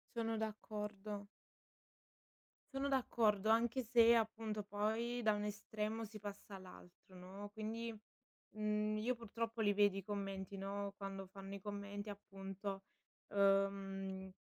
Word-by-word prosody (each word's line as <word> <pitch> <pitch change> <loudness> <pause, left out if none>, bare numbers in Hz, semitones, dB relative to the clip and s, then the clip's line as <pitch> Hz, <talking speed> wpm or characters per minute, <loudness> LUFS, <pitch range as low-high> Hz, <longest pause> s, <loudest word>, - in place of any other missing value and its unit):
Sono 225 -1 +1
d'accordo. 210 -1 -3 1.5
Sono 270 +1 +1
d'accordo, 220 -5 +3
anche 235 +3 +4
se 235 0 +7
appunto 220 -2 0
poi 220 +4 0
da 215 -2 +5
un 205 - -1
estremo 210 +1 -2
si 215 0 -7
passa 200 0 -6
all'altro, 185 0 -12
no. 190 +3 -7
Quindi, 225 +1 -3 0.6
mhmm, 215 0 +2
io 245 +4 +1
purtroppo 230 0 -3
li 205 -2 +5
vedo 205 -1 +5
i 195 - -3
commenti, 195 -1 -3
no, 200 +1 -2
quando 195 -1 -4
fanno 195 +1 -8
i 200 - -7
commenti 205 +1 -4
appunto, 195 -1 -5 0.5
ehm, 195 -1 +2
205 Hz, 125 wpm, -40 LUFS, 195-220 Hz, 1.5 s, se